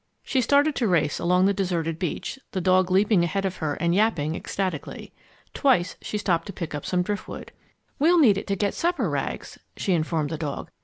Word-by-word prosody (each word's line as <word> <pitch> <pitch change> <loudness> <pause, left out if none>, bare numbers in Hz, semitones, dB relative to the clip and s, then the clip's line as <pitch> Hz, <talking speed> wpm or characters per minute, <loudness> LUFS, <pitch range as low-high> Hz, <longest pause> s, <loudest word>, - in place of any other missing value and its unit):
She 260 - +1
started 285 +5 +3
to 235 - +1
race 165 -6 +1
along 180 +2 +3
the 200 - +3
deserted 170 -4 -2
beach, 185 - -4
the 190 - -1
dog 185 0 +3
leaping 195 0 +3
ahead 195 +4 -1
of 190 -1 -2
her 150 -2 -2
and 170 0 0
yapping 180 -7 +1
ecstatically. 185 -6 -4 0.4
Twice 220 - +2
she 210 - -4
stopped 185 -4 0
to 200 - -6
pick 170 -3 -5
up 145 - -5
some 180 -1 +1
driftwood. 205 +2 -5 0.5
"We'll 335 +5 +4
need 220 - +5
it - - -10
to 200 - 0
get 200 0 0
supper, 340 - 0
Rags," 140 -1 -4 0.2
she 190 - 0
informed 160 -2 0
the 160 - -4
dog. 145 -3 -5
185 Hz, 200 wpm, -25 LUFS, 165-210 Hz, 0.5 s, need